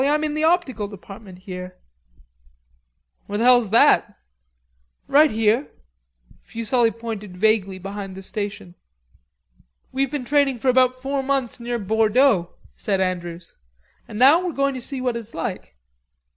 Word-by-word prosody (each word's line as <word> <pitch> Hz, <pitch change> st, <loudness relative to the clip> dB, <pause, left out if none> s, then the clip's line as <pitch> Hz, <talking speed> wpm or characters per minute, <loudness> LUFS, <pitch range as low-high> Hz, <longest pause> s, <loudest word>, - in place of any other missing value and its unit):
"I'm 300 Hz, +2 st, +1 dB
in 305 Hz, -1 st, -1 dB
the 310 Hz, +1 st, -1 dB
optical 315 Hz, -, +1 dB
department 195 Hz, -1 st, -12 dB
here." 180 Hz, -2 st, -8 dB, 1.5 s
"Where 205 Hz, -, -3 dB
the 225 Hz, -, 0 dB
hell's 245 Hz, -3 st, +5 dB
that?" 225 Hz, -, +4 dB, 0.9 s
"Right 300 Hz, +2 st, +5 dB
here." 225 Hz, +4 st, +1 dB, 0.7 s
Fuselli 230 Hz, +1 st, 0 dB
pointed 220 Hz, -5 st, -7 dB
vaguely 200 Hz, -2 st, +1 dB
behind 195 Hz, 0 st, -7 dB
the 190 Hz, -, -9 dB
station. 205 Hz, -2 st, -5 dB, 1.2 s
"We've 270 Hz, +1 st, 0 dB
been 280 Hz, -3 st, -4 dB
training 275 Hz, -2 st, +2 dB
about 255 Hz, 0 st, +4 dB
four 270 Hz, +2 st, -3 dB
months 265 Hz, -3 st, -2 dB
near 240 Hz, 0 st, -3 dB
Bordeaux," 220 Hz, -1 st, +2 dB, 0.3 s
said 195 Hz, -2 st, -1 dB
Andrews; 175 Hz, -2 st, -4 dB, 0.5 s
"and 210 Hz, -, -8 dB
now 280 Hz, +9 st, +6 dB
we're 355 Hz, -2 st, -3 dB
going 275 Hz, 0 st, 0 dB
to 255 Hz, -, -6 dB
see 265 Hz, +1 st, -4 dB
what 250 Hz, -2 st, -1 dB
it's 230 Hz, -1 st, -8 dB
like." 185 Hz, -, -5 dB
230 Hz, 135 wpm, -22 LUFS, 200-265 Hz, 1.5 s, now